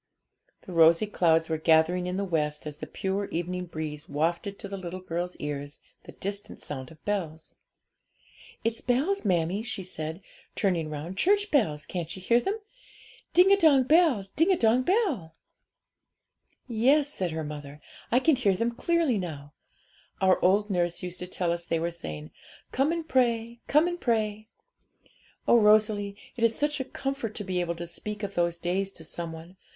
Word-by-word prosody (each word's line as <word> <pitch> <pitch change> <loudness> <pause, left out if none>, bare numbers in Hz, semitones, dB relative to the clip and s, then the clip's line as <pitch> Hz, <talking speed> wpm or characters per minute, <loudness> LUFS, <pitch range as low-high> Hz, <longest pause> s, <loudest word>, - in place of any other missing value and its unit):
The 185 - -9
rosy 165 +3 +6
clouds 165 -5 +2
were 160 -1 -1
gathering 165 +3 +3
in 180 +1 -2
the 200 - 0
west, 150 -4 -1
as 150 -1 -6
the - - -7
pure 195 +1 -2
evening 180 +1 -3
breeze 155 -2 -6
wafted 170 +7 -1
to 200 - -7
the 200 - -5
little 185 -1 -6
girl's 180 0 -4
ears 145 0 -5 0.3
the - - -10
distant 200 +1 -5
sound 130 -3 -6
of 160 -1 -17
bells. 165 -6 -3 1.1
'It's 230 0 -1
bells, 285 +11 +1
mammie,' 180 0 +1
she 220 -4 -5
said, 160 0 -6 0.3
turning 175 -7 0
round, 155 +6 -6
'church 405 +2 +3
bells; 155 - +1
can't 170 -2 -4
you - - -8
hear 235 +6 +3
them? 390 - -2 0.8
Ding 375 +3 +7
dong 285 -6 +6
bell, 300 - +4
ding 350 +4 +4
dong 230 0 +4
bell.' 285 - 0 1.3
'Yes,' 275 +5 +3
said 185 -2 -1
her 160 0 -3
mother, 150 -1 -7 0.3
'I 245 - +5
can 315 +1 +4
hear 205 -7 +2
them 230 +5 0
clearly 315 - +1
now; 150 -5 -6 0.7
our 190 -1 +3
old 205 +3 +3
nurse 175 -2 0
used 180 0 -4
to 180 - -4
tell 180 -1 -1
us 170 0 -2
they 165 - -1
were 170 +1 -1
saying, 75 - -7 0.4
"Come 275 +4 +2
and 335 -1 -3
pray, 235 -3 +1
come 300 +4 +4
and 350 0 -4
pray." 215 -2 0 1.0
Oh, 235 - +6
Rosalie, 210 -1 +3 0.2
it 230 - -2
is 230 -1 +3
such 295 0 0
a 265 - -2
comfort 270 -5 -4
to 210 - -4
be 185 -2 -2
able 170 -1 -2
to 170 +1 -6
speak 210 +5 -5
of 200 -1 -3
those 170 -1 +1
days 185 +3 -1
to 160 - -10
some 165 +1 -4
one! 165 +3 -11
190 Hz, 175 wpm, -28 LUFS, 165-235 Hz, 1.3 s, Ding